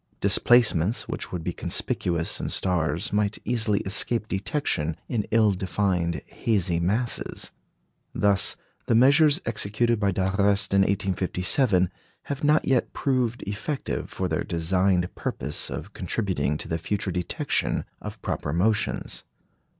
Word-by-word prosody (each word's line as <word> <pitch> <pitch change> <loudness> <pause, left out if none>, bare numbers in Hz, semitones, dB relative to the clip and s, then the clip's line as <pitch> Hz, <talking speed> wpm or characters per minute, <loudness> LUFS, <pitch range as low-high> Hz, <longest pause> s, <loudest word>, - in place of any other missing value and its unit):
Displacements 105 -2 +3
which - - -5
would 90 -3 -4
be - - -3
conspicuous 85 -2 0
in - - -3
stars 85 -2 +1
might 105 0 0
easily 110 -4 +1
escape 110 +3 0
detection 95 - -1
in 110 -4 -2
ill 110 -2 +4
defined, 90 -4 -1
hazy 95 -7 0
masses. 110 +8 -1 0.6
Thus 100 -2 +2 0.3
the 115 - +3
measures 145 +6 +5
executed 115 +1 0
by 100 -2 +1
d'Arrest 100 +1 +1
in 100 - +5
1857 95 +1 +2 0.3
have 140 0 -5
not 150 +1 +3
yet 130 -3 +1
proved 125 -3 -1
effective 105 +9 -4
for 95 - -3
their 80 -2 -1
designed 90 +1 0
purpose 70 +4 -3
of - - -7
contributing 75 +2 -1
to - - -6
the 80 - -2
future 100 +3 -2
detection 90 0 -1 0.2
of - - -8
proper 75 - -3
motions. 100 +7 0
100 Hz, 125 wpm, -25 LUFS, 90-115 Hz, 0.6 s, measures